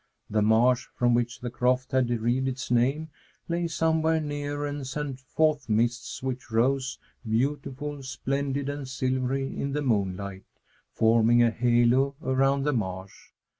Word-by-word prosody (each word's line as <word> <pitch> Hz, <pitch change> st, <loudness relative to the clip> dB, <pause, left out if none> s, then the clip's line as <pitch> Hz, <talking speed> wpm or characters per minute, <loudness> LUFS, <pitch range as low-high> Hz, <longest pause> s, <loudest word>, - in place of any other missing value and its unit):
The 105 Hz, 0 st, +2 dB
marsh, 120 Hz, +4 st, +3 dB
from 120 Hz, -1 st, +2 dB
which 120 Hz, +1 st, -1 dB
the 120 Hz, -1 st, -4 dB
croft 125 Hz, +2 st, 0 dB
had 130 Hz, -2 st, +2 dB
derived 120 Hz, +3 st, 0 dB
its 130 Hz, -1 st, -4 dB
name, 135 Hz, +7 st, +1 dB, 0.4 s
lay 170 Hz, 0 st, -1 dB
somewhere 160 Hz, 0 st, +1 dB
near 145 Hz, -1 st, -3 dB
and 145 Hz, -2 st, -4 dB
sent 135 Hz, -1 st, -4 dB
forth 150 Hz, +1 st, 0 dB
mists 120 Hz, +4 st, 0 dB
which 130 Hz, -2 st, -4 dB
rose, 130 Hz, +3 st, +1 dB, 0.3 s
beautiful, 140 Hz, +4 st, -2 dB
splendid, 135 Hz, +1 st, -2 dB
and 145 Hz, -1 st, -4 dB
silvery, 130 Hz, +1 st, -1 dB
in 140 Hz, 0 st, -3 dB
the 150 Hz, 0 st, -1 dB
moonlight, 100 Hz, -5 st, -1 dB, 0.5 s
forming 115 Hz, +1 st, +4 dB
a 115 Hz, -, +3 dB
halo 120 Hz, +3 st, +3 dB
around 135 Hz, +1 st, +2 dB
the 150 Hz, +1 st, +1 dB
marsh. 95 Hz, -4 st, -5 dB
130 Hz, 140 wpm, -27 LUFS, 120-140 Hz, 0.5 s, forming